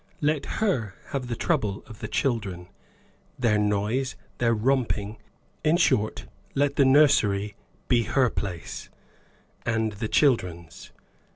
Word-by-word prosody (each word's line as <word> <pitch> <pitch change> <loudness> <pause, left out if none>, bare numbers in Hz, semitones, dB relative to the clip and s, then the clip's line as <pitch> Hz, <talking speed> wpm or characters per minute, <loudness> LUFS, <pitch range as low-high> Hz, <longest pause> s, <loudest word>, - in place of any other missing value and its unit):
Let 150 -1 0
her 125 - 0
have 135 -4 -3
the 120 - -2
trouble 110 - -1
of 110 -2 -12
the - - -5
children, 100 -9 -2 0.7
their 110 -4 +2
noise, 105 +6 0 0.2
their 115 -1 +3
romping; 115 -3 0 0.5
in 160 +2 +4
short, 110 - +1 0.3
let 140 0 +1
the 140 - +4
nursery 105 -8 +4 0.3
be 120 -3 +3
her 125 +1 +2
place, 90 -5 -5 0.7
and 115 -2 0
the 105 +2 -4
children's. 90 - 0
115 Hz, 120 wpm, -26 LUFS, 105-135 Hz, 0.7 s, in